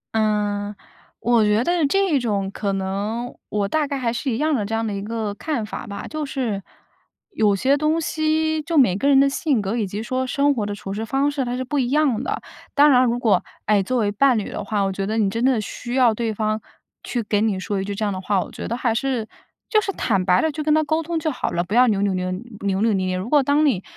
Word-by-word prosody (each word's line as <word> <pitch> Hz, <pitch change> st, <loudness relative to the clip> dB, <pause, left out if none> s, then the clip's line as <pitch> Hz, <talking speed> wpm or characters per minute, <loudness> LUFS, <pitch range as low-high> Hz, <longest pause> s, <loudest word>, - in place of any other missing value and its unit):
嗯， 210 Hz, -1 st, 0 dB, 0.5 s
我 235 Hz, -2 st, +3 dB
觉 210 Hz, +2 st, +3 dB
得 345 Hz, 0 st, +1 dB
这 380 Hz, -2 st, +2 dB
种 205 Hz, -5 st, -1 dB
可 200 Hz, 0 st, -2 dB
能 200 Hz, +5 st, -3 dB
我 205 Hz, -1 st, 0 dB
大 300 Hz, +6 st, 0 dB
概 280 Hz, -, -3 dB
还 240 Hz, -3 st, -1 dB
是 265 Hz, +3 st, -2 dB
一 225 Hz, -, -1 dB
样 305 Hz, +3 st, +1 dB
的 220 Hz, -6 st, +1 dB
这 215 Hz, -, -4 dB
样 225 Hz, 0 st, -1 dB
的 210 Hz, -, -2 dB
一 200 Hz, -, -3 dB
个 215 Hz, 0 st, -3 dB
看 245 Hz, 0 st, -3 dB
法 215 Hz, -, -7 dB
吧。 200 Hz, -1 st, -6 dB
就 310 Hz, 0 st, -4 dB
是， 250 Hz, -8 st, -2 dB, 0.7 s
有 210 Hz, -, +2 dB
些 265 Hz, +8 st, +2 dB
东 305 Hz, +3 st, +1 dB
西 315 Hz, 0 st, 0 dB
就 325 Hz, +1 st, -2 dB
每 200 Hz, -10 st, +5 dB
个 275 Hz, -, 0 dB
人 275 Hz, -1 st, +6 dB
的 275 Hz, -, +5 dB
性 275 Hz, -, 0 dB
格， 200 Hz, +2 st, -2 dB
以 220 Hz, -4 st, -1 dB
及 205 Hz, +4 st, -5 dB
说 255 Hz, +2 st, -1 dB
生 285 Hz, +2 st, +2 dB
活 215 Hz, -5 st, -2 dB
的 205 Hz, -, -3 dB
处 195 Hz, -1 st, -6 dB
事 215 Hz, +2 st, -3 dB
方 275 Hz, +5 st, +1 dB
式 280 Hz, -2 st, -1 dB
它 245 Hz, 0 st, -3 dB
是 260 Hz, -, -2 dB
不 285 Hz, +3 st, -1 dB
一 245 Hz, -2 st, 0 dB
样 280 Hz, -5 st, +2 dB
的。 -, -, -3 dB, 0.3 s
当 290 Hz, 0 st, +6 dB
然 255 Hz, 0 st, +6 dB
如 240 Hz, 0 st, +1 dB
果， 220 Hz, -7 st, +2 dB, 0.2 s
哎， 210 Hz, -1 st, +3 dB
作 255 Hz, +7 st, -1 dB
为 210 Hz, -3 st, +1 dB
伴 255 Hz, +4 st, +3 dB
侣 210 Hz, -, -3 dB
的 -, -, -5 dB
话， 210 Hz, -2 st, -1 dB
我 195 Hz, -, 0 dB
觉 195 Hz, 0 st, -3 dB
得 220 Hz, +2 st, -1 dB
你 200 Hz, -3 st, +2 dB
真 230 Hz, +3 st, -2 dB
的 255 Hz, -3 st, +3 dB
需 240 Hz, +4 st, -5 dB
要 245 Hz, -4 st, +5 dB
对 225 Hz, 0 st, -2 dB
方 215 Hz, 0 st, -1 dB, 0.4 s
去 240 Hz, -2 st, -2 dB
给 210 Hz, 0 st, 0 dB
你 210 Hz, -4 st, +1 dB
说 195 Hz, +1 st, -2 dB
一 -, -, -2 dB
句 200 Hz, 0 st, -4 dB
这 215 Hz, -, -1 dB
样 205 Hz, -, -1 dB
的 185 Hz, -, -5 dB
话， 195 Hz, 0 st, +1 dB
我 -, -, -12 dB
觉 -, -, -6 dB
得 235 Hz, -, -2 dB
还 240 Hz, -3 st, +1 dB
是 235 Hz, -2 st, -1 dB, 0.4 s
就 430 Hz, -, +3 dB
是 395 Hz, -, -2 dB
坦 195 Hz, -, 0 dB
白 180 Hz, 0 st, +3 dB
地 320 Hz, -, +1 dB
就 305 Hz, +1 st, -4 dB
跟 305 Hz, 0 st, +3 dB
他 310 Hz, -, +3 dB
沟 315 Hz, +2 st, 0 dB
通 330 Hz, +1 st, -3 dB
就 315 Hz, -1 st, -1 dB
好 -, -, -2 dB
了， 175 Hz, 0 st, -1 dB
不 190 Hz, -, -6 dB
要 250 Hz, +2 st, +6 dB
扭 200 Hz, -3 st, +1 dB
扭 200 Hz, -2 st, +1 dB
捏 185 Hz, 0 st, -2 dB
扭 205 Hz, +7 st, -6 dB, 0.4 s
扭 225 Hz, -1 st, +3 dB
捏 190 Hz, -1 st, 0 dB
捏。 185 Hz, 0 st, -1 dB
如 185 Hz, +5 st, -4 dB
果 295 Hz, -2 st, +6 dB
当 285 Hz, +3 st, +2 dB
你 215 Hz, -10 st, +1 dB
230 Hz, 290 characters per minute, -22 LUFS, 205-280 Hz, 0.7 s, 人